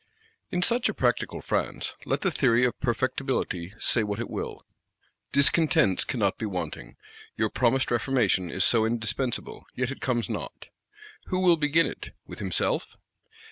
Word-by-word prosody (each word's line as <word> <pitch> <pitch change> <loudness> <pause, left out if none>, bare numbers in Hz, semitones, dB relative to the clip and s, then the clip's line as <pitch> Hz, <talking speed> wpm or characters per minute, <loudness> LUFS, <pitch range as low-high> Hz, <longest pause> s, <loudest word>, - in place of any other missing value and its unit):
In 180 0 0
such 235 +4 +2
a - - -3
practical - - 0
France, - - -2
let - - 0
the 190 - +1
theory 125 -5 +3
of 125 - +1
Perfectibility 120 -7 -2
say 120 - +2
what 105 0 -3
it 120 - -5
will, - - -5 0.7
discontents 150 - +4
cannot 100 -6 -1
be 110 - -2
wanting: 90 -3 -5 0.4
your 110 -1 0
promised 130 +2 +1
Reformation 115 -7 +1
is 95 +1 +1
so 115 -2 +4
indispensable; 115 +2 -2
yet 130 +1 -1
it 135 - -8
comes 120 -3 0
not; - - -6 0.6
who 185 - -1
will 180 -2 +5
begin 155 +1 +3
it—with - - -9
himself? - - -1
125 Hz, 145 wpm, -27 LUFS, 110-140 Hz, 0.7 s, will